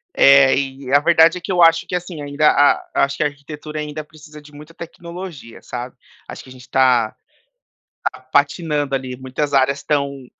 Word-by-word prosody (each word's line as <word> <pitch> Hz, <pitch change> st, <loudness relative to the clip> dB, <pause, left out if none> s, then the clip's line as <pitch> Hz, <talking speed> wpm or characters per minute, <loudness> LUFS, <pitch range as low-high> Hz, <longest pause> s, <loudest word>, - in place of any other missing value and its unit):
É, 135 Hz, -1 st, +6 dB
e 135 Hz, -1 st, -4 dB
a 145 Hz, -, +7 dB
verdade 165 Hz, +3 st, +4 dB
é -, -, -13 dB
que 185 Hz, +3 st, -5 dB
eu 175 Hz, -1 st, +3 dB
acho 165 Hz, 0 st, +4 dB
que, -, -, -6 dB
assim, 180 Hz, -3 st, -5 dB
ainda 145 Hz, +1 st, +2 dB
a 145 Hz, 0 st, +2 dB
acho 140 Hz, 0 st, -4 dB
que -, -, -3 dB
a -, -, +2 dB
arquitetura 150 Hz, +1 st, -8 dB
ainda 150 Hz, 0 st, -5 dB
precisa 150 Hz, 0 st, -15 dB
de 150 Hz, 0 st, -17 dB
muita 150 Hz, +3 st, -14 dB
tecnologia, 170 Hz, -6 st, -10 dB
sabe. 125 Hz, +1 st, -7 dB, 0.3 s
Acho -, -, -9 dB
que -, -, -18 dB
a -, -, -12 dB
gente 130 Hz, -1 st, -14 dB
está 125 Hz, -4 st, +2 dB, 0.9 s
está -, -, -5 dB
patinando 150 Hz, -5 st, -1 dB
ali, 130 Hz, -1 st, -5 dB
muitas 130 Hz, +3 st, -4 dB
áreas 135 Hz, 0 st, +2 dB
estão 140 Hz, -2 st, -2 dB
145 Hz, 190 wpm, -19 LUFS, 135-155 Hz, 0.9 s, a